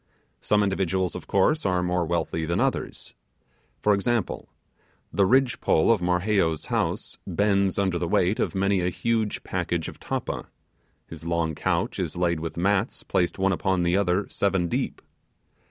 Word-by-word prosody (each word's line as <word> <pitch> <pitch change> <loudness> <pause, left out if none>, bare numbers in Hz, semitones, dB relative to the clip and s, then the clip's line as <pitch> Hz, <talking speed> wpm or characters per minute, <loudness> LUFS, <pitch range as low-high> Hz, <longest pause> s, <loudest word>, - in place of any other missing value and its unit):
Some 105 0 +2
individuals, 95 -2 0
of - - -7
course, 150 +11 +2
are 90 -2 +1
more 90 -1 0
wealthy 80 -1 -1
than 85 - 0
others. - - -2 0.7
For 105 - +5
example, 110 +2 -1 0.6
the 100 -1 +3
ridge 130 +3 +3
pole 80 +8 +3
of 110 -5 +2
Marheyo's 90 -2 +1
house - - -1
bends 100 -2 +1
under 95 -3 +1
the 85 - -1
weight 90 +5 +2
of - - -1
many 100 0 +2
a 90 - +1
huge 110 +4 -1
packet - - -2
of - - -9
tappa; - - -4 0.6
his 80 -1 -10
long 85 -1 0
couch - - -1
is - - -3
laid 85 -2 +1
with 80 0 -5
mats 100 +5 0
placed 85 -1 0
one 95 0 +2
upon 95 0 0
the 85 +1 +2
other 100 0 +1
seven 95 -3 0
deep. - - -3
95 Hz, 160 wpm, -25 LUFS, 85-100 Hz, 0.7 s, For